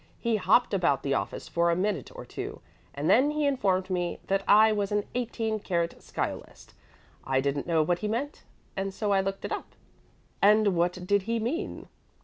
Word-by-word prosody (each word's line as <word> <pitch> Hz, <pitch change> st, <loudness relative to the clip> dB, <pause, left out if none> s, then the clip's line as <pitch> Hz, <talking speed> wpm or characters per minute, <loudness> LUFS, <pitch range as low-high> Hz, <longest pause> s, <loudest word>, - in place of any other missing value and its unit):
He 230 Hz, -2 st, +1 dB
hopped 215 Hz, +4 st, +3 dB
about 170 Hz, -8 st, +2 dB
the 140 Hz, -, 0 dB
office -, -, -3 dB
for 170 Hz, 0 st, +1 dB
a 170 Hz, -, +2 dB
minute 185 Hz, -5 st, -1 dB
or -, -, -8 dB
two, -, -, -6 dB, 0.4 s
and 145 Hz, +2 st, -2 dB
then 255 Hz, +10 st, +5 dB
he 300 Hz, 0 st, 0 dB
informed 195 Hz, -10 st, +1 dB
me 175 Hz, -1 st, -1 dB
that 195 Hz, 0 st, 0 dB
I 215 Hz, +2 st, +7 dB
was 205 Hz, -2 st, -1 dB
an 210 Hz, 0 st, +1 dB
18 225 Hz, -3 st, -2 dB
karat 170 Hz, -4 st, -2 dB
sciolist. -, -, -6 dB, 0.5 s
I 130 Hz, 0 st, +1 dB
didn't 140 Hz, +2 st, -1 dB
know 165 Hz, -2 st, +3 dB
what 175 Hz, +2 st, 0 dB
he 210 Hz, -, -2 dB
meant, 250 Hz, +7 st, -3 dB, 0.3 s
and 195 Hz, 0 st, -3 dB
so 210 Hz, -2 st, -1 dB
I 195 Hz, -1 st, +4 dB
looked 195 Hz, 0 st, -4 dB
it -, -, -5 dB
up." -, -, -5 dB, 0.7 s
"And 210 Hz, -1 st, +5 dB
what 175 Hz, +1 st, +2 dB
did 200 Hz, +2 st, +2 dB
he 230 Hz, -, +1 dB
mean?" 290 Hz, -, -3 dB
195 Hz, 190 wpm, -28 LUFS, 175-220 Hz, 0.7 s, I